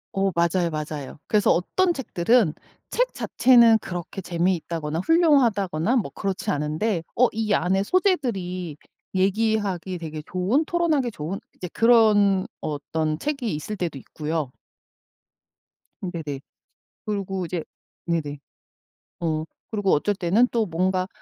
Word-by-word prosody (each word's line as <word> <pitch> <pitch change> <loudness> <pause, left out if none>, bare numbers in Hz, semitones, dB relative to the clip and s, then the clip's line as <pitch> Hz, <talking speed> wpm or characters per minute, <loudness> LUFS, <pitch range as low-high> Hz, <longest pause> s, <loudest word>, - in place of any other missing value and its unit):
어 195 0 +2
맞아요, 170 0 +2
맞아요. 150 -3 -5
그래서 210 -1 +3
어떤 350 - +2
책들은 230 - +2 0.4
책 - - +1
자체는 235 -3 +5
그렇게 180 +1 -6
재미있다거나 170 -3 -1
훌륭하다거나 240 - +3
뭐 225 - -1
그렇지 195 -2 -2
않은데 155 +7 -1
어 250 - +5
이 220 -1 -2
안에 190 +2 +1
소재들이 200 - 0 0.4
얘기하기에 195 -2 0
되게 155 -2 -6
좋은 195 - +1
토론하기 315 -7 +1
좋은 170 +3 -5 0.2
이제 180 - -6
그런 210 -5 +4 0.2
어떤 155 +1 -2
책이 265 - -2
있을 185 +8 -5
때도 170 -7 -3
있고요. 150 -1 -4 1.5
음 180 - -3
네네. 150 -5 -5 0.7
그리고 195 -3 -2
이제 170 -1 -3 0.4
네네. 150 -4 -2 0.8
어 155 -2 -1 0.3
그리고 205 -3 0
어쩔 205 +8 +2
때는 195 +7 +3
또 230 -2 +1
뭔가 185 +1 0
185 Hz, 285 characters per minute, -24 LUFS, 165-225 Hz, 1.5 s, 자체는